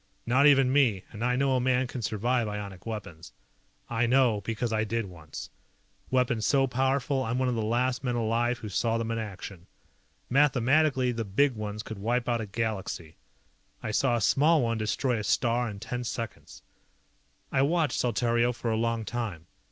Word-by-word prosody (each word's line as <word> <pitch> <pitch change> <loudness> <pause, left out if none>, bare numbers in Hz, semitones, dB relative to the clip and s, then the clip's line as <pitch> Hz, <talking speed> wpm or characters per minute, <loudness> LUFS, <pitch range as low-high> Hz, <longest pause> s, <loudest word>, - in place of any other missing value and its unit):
Not 130 +5 +4
even 135 -3 +5
me 120 -10 +3
and 110 +1 -6
I 125 0 +2
know 135 0 +2
a - - +2
man 130 0 +2
can 125 0 -6
survive 115 +3 0
ionic 100 -2 -6
weapons. 90 - -7 0.5
I 115 0 0
know 120 -4 +3
because 115 +2 -2
I 110 0 +1
did 115 +1 -2
once. 80 -6 -9 0.6
Weapons 125 -3 +1
so 135 +1 +3
powerful 135 +1 0
I'm 115 +1 -1
one 130 0 +1
of - - 0
the 115 - -1
last 125 +4 0
men 125 -2 -1
alive 120 +1 +1
who 110 - -8
saw 115 +3 0
them 115 0 -2
in 115 - -1
action. 95 -4 -7 0.6
Mathematically 135 0 +3
the 115 -1 -3
big 125 +7 +2
ones 105 -1 -5
could 110 -3 -7
wipe 120 +4 0
out 120 -2 +1
a 110 - -5
Galaxy. 100 -7 -4 0.7
I 110 - -2
saw 120 +3 +2
a 115 - -1
small 150 +6 +4
one 115 -1 0
destroy 110 +3 0
a - - -4
star 120 +3 +1
in 100 -2 -8
ten 125 +4 -4
seconds. 115 -1 -6 0.9
I 135 - +2
watched 155 -1 +1
Saltario 120 0 +1
for 115 -1 -2
a 110 - +1
long 115 0 -1
time. 105 -10 -4
120 Hz, 185 wpm, -28 LUFS, 110-130 Hz, 0.9 s, even